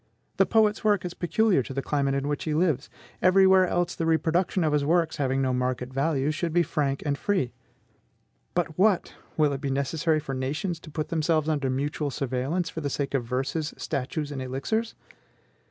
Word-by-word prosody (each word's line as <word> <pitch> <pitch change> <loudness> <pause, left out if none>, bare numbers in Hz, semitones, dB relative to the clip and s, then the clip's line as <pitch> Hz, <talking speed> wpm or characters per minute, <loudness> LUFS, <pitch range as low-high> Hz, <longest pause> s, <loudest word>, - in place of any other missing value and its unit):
The - - +4
poet's 215 -2 +3
work 205 -4 +2
is 175 - -4
peculiar 190 -1 +2
to 130 +2 -7
the 135 - 0
climate 140 -2 0
in 140 +1 -1
which 145 0 -2
he 155 -2 -1
lives; 155 -5 +1 0.3
every 190 +1 +6
where 190 -1 +6
else 175 0 0
the 165 - -2
reproduction 170 +3 +1
of 155 -2 +1
his 145 -1 +2
works, 165 +1 +1
having 135 -2 0
no 130 -1 +1
market 125 0 -2
value, 140 +1 +1
should 165 +1 -2
be 175 0 +4
frank 140 -4 -1
and 145 -1 +1
free. 165 -7 -1 1.0
But 170 -2 -1
what! 200 -2 +3 0.2
will 150 -2 +3
it 135 - -4
be 140 - -2
necessary 155 +4 0
for 140 -2 -5
nations 150 +7 -2
to 160 - -12
put 155 0 -4
themselves 160 -1 +1
under 145 -4 0
mutual 145 +3 -1
surveillance 135 +6 -2
for 160 - -5
the 145 - -2
sake 140 0 -3
of 130 -4 0
verses, 135 +6 -2
statues, 145 +1 -3
and 135 -2 -4
elixirs? 135 - -2
150 Hz, 195 wpm, -26 LUFS, 135-170 Hz, 1.0 s, every